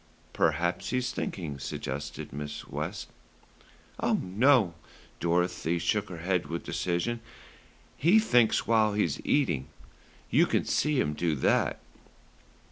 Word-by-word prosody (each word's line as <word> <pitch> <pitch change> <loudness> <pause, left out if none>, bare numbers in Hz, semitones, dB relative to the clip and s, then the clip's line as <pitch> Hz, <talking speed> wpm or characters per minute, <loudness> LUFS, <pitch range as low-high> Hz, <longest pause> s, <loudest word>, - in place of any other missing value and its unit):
"Perhaps 80 +2 0
he's 125 0 0
thinking," 80 - -4
suggested 65 +1 -5
Mrs. 75 0 -6
West. - - -4 0.9
"Oh, - - +1
no!" 105 0 +3 0.5
Dorothy 85 0 0
shook 105 +4 0
her 90 - -7
head 90 +1 -1
with 85 +1 -4
decision. 90 +7 -1 0.8
"He 170 +9 +5
thinks 125 - +3
while 110 -2 +3
he's 85 -9 0
eating. 85 - +1 0.6
You - - +5
can - - +1
see 150 -2 +1
him 75 - +1
do 80 0 0
it. - - +2
90 Hz, 120 wpm, -29 LUFS, 80-120 Hz, 0.9 s, He